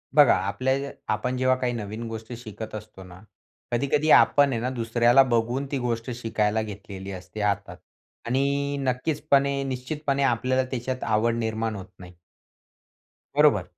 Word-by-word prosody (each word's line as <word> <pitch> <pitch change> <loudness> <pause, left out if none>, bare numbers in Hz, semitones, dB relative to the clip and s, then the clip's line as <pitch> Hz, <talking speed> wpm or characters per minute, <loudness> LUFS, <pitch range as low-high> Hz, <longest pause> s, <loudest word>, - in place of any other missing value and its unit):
बघा 145 -4 +7
आपल्या 130 +7 0 0.4
आपण 125 +4 -2
जेव्हा 130 0 +3
काही 125 -1 0
नवीन 110 +1 -5
गोष्टी 110 +1 -7
शिकत 110 -1 -8
असतो 105 -3 -9
ना, 90 0 -13 0.5
कधी-कधी 140 +5 +1
आपण 145 -1 +3
आहे 115 - -1
ना 125 - -1
दुसऱ्याला 120 +3 +4
बघून 120 +4 0
ती 140 - 0
गोष्ट 120 -1 -2
शिकायला 110 -2 0
घेतलेली 100 -2 -7
असते 95 +3 -7
हातात 100 -1 -1 0.5
आणि 140 +3 0
नक्कीचपणे 140 +1 +1
निश्चितपणे 140 +2 -2
आपल्याला 130 +1 +2
त्याच्यात 130 +1 -3
आवड 115 +2 +1
निर्माण 110 -1 -2
होत 95 -2 -7
नाही 90 -1 -12 1.2
बरोबर? 145 -10 +5
120 Hz, 140 wpm, -25 LUFS, 110-135 Hz, 1.2 s, बघा